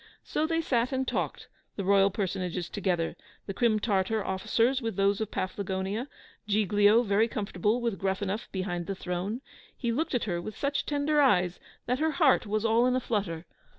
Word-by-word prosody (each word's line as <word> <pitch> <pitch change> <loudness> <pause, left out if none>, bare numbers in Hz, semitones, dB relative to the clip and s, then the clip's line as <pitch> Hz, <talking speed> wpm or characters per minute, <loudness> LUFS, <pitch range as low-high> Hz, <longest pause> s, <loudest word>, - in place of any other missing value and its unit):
So 310 - -1
they 330 0 +1
sat 250 -5 +1
and 265 -1 -1
talked, - - -2 0.3
the 200 - -3
royal 195 +1 +5
personages 185 -3 -3
together, 180 -5 -1 0.3
the 195 - -4
Crim 220 +1 +2
Tartar 205 0 0
officers 230 +7 +1
with 225 -4 -3
those 200 +2 +2
of 215 - -2
Paflagonia 190 +5 -3 0.4
Giglio 205 +2 +4
very 210 +1 +3
comfortable 210 +1 -1
with 230 -5 -1
Gruffanuff 195 +2 -2
behind 180 -3 -3
the 195 - -2
throne. 185 +7 -3 0.4
He 235 -3 -1
looked 285 +3 -1
at 245 - +1
her 175 -4 -2
with 215 +4 -7
such 280 0 -1
tender 295 +1 +2
eyes, 180 -10 +3 0.3
that 250 +2 0
her 315 0 +1
heart 275 - +3
was 215 +2 -1
all 230 +2 +4
in 255 - +2
a - - +2
flutter. 195 -9 -2
210 Hz, 180 wpm, -28 LUFS, 190-240 Hz, 0.4 s, royal